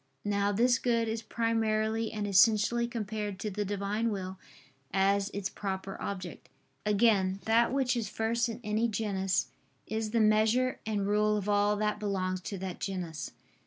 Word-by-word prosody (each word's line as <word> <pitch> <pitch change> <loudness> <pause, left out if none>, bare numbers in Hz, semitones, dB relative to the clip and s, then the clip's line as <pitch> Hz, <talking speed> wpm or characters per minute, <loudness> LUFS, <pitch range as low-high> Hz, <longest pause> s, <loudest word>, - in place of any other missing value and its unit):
Now 200 0 +1
this 245 +4 +3
Good 230 -2 +1
is 220 0 -2
primarily 225 -1 0
and 210 -1 -3
essentially 215 +4 +4
compared 215 -3 -4
to 210 +2 -4
the 205 +2 -2
Divine 205 +3 -1
will, 190 -2 -4 0.5
as 195 +1 +2
its 200 -2 -3
proper 195 -1 -4
object. 185 -4 -6 0.4
Again, 200 -3 +3
that 230 +1 +3
which 260 -2 +1
is 225 -4 -2
first 230 +2 0
in 230 - -5
any 215 +2 +1
genus 195 - -1 0.3
is 220 0 -2
the 230 +2 +1
measure 220 +4 +3
and 205 -2 0
rule 210 +1 +2
of 205 -1 -4
all 205 0 +3
that 210 0 -1
belongs 185 -3 -1
to 200 +2 -5
that 185 -1 -5
genus. 180 -5 -4
210 Hz, 160 wpm, -30 LUFS, 195-225 Hz, 0.5 s, essentially